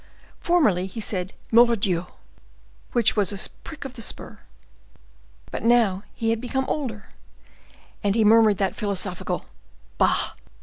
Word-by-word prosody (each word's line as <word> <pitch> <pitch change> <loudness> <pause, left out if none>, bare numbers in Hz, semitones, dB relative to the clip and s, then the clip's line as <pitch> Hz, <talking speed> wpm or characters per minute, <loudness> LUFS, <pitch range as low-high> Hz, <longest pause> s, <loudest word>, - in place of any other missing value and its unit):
Formerly 215 - +2
he 225 - -8
said, 190 -3 -3 0.2
"Mordioux!" 215 -7 +4 0.8
which 235 -3 +3
was 205 -3 +2
a 200 - 0
prick 315 -3 -9
of 265 - -7
the 245 - -9
spur, - - -5 1.1
but - - -4
now 225 -5 +3
he 225 0 0
had 225 0 -1
become 265 +2 -2
older, 235 -9 -4 0.9
and 200 0 +1
he 225 -2 +3
murmured 220 -1 +6
that 195 -2 0
philosophical 200 -3 -3 0.5
"Bah!" - - +2
220 Hz, 130 wpm, -24 LUFS, 195-240 Hz, 1.1 s, murmured